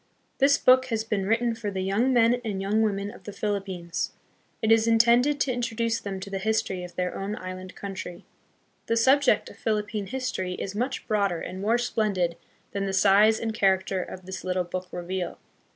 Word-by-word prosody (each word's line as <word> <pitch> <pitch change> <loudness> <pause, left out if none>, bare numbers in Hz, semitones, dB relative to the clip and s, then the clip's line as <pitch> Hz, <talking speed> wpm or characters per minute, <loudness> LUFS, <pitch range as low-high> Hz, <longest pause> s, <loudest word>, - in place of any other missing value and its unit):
This 280 +1 +5
book 255 0 +5
has 225 -4 -1
been 205 -4 -2
written 230 +2 +2
for 225 -2 -4
the 190 -1 -3
young 210 +7 +2
men 240 0 +4
and 205 -4 -3
young 200 +3 +1
women 200 -2 0
of - - -14
the 205 - -6
Philippines, 195 -4 -3 0.5
It 220 - +1
is 225 0 +5
intended 240 +5 +4
to 260 - +1
introduce 230 -1 -1
them 195 -3 -5
to 200 - -7
the 195 - -2
history 195 -3 -1
of 180 - -9
their 180 -1 -1
own 200 +2 -3
island 185 -1 -8
country. 190 -3 -7 0.6
The 230 - +1
subject 265 +3 +3
of - - -16
Philippine 210 -2 -2
history 245 -8 -3
is 190 - -5
much 250 +5 -3
broader 200 -6 +1
and 185 +1 -6
more 225 +4 +2
splendid 210 -8 0 0.4
than 200 -1 -2
the 195 - -2
size 205 +3 +5
and 225 -1 -2
char 195 -3 +4
acter 190 0 -3
of 185 0 -10
this 190 0 -6
little 185 0 0
book 180 +1 -5
reveal. 180 0 -4
205 Hz, 195 wpm, -26 LUFS, 190-230 Hz, 0.6 s, This